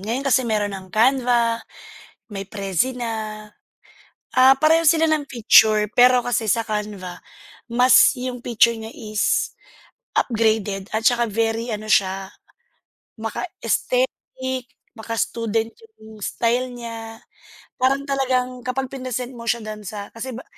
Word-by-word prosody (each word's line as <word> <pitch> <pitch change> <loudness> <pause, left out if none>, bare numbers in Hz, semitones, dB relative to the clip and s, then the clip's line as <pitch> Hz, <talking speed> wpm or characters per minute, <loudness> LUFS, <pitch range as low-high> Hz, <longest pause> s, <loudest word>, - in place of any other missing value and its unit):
Ngayon 230 +7 -3
kasi 265 -1 +3
meron 210 -2 0
ng 190 -1 -8
Canva, 235 +1 +2 0.7
may 195 -2 -6
Prezi 200 +5 -1
na, 240 -2 -4 1.3
ah, 260 +1 +7
pareho 320 +3 +4
sila 325 0 +4
ng 305 -3 0
picture 215 -3 +5
pero 250 0 +5
kasi 225 -3 0
sa 230 +1 +1
Canva 210 -4 -5 0.5
mas 250 +3 +6
yung 250 -1 -5
picture 235 0 +4
niya 220 0 -8
is 215 -1 0 0.7
upgraded 215 -4 0
at 220 +1 -1
saka 235 -1 +3
very 225 +2 -1
ano 215 -1 -4
siya, 195 -2 +1 0.9
maka-aesthetic, 260 - -2 0.3
maka-student 225 0 -2 0.3
yung 220 0 -13
style 245 +2 0
niya. 230 -2 -8 0.6
Parang 270 +2 +2
talagang 255 -2 -1
kapag 255 +1 -3
prinesent 255 -1 -4
mo 235 -2 -10
siya 235 - +1
dun 215 -1 -7
sa 205 -2 -7
kasi 235 +1 -6
ba 255 - -9
230 Hz, 125 wpm, -22 LUFS, 215-255 Hz, 1.3 s, ah